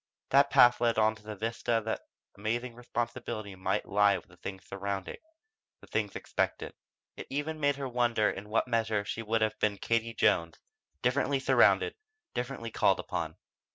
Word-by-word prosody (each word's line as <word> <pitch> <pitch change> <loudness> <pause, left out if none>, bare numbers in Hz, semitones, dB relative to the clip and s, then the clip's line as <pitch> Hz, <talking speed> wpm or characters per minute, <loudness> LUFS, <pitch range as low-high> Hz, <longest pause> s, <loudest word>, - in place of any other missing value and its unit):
That 140 +1 +6
path 120 -2 +6
led 115 -1 +3
to 110 0 +3
the 105 0 -7
vista 115 +2 -1
that 110 - -3 0.3
amazing 115 +4 -2
responsibility 120 -3 -4
might 95 - -1
lie 100 -1 +4
with - - -13
the 90 - -17
things 95 +1 -7
surrounding 100 0 -4 0.6
the - - -15
things - - -2
expected. - - -2 0.4
It - - -8
even 150 +3 -3
made 145 -1 +2
her 140 -1 -4
wonder 120 -3 +2
in 105 +1 -4
what 115 +3 +1
measure 110 -3 0
she 115 - -4
would 115 0 0
have 110 0 -1
been 105 -1 +1
Katie 115 +3 0
Jones, 85 -1 +2 0.5
differently 135 +2 +2
surrounded, 135 - +4 0.4
differently 125 -2 -4
called - - +3
upon. - - -4
115 Hz, 160 wpm, -30 LUFS, 105-125 Hz, 0.6 s, That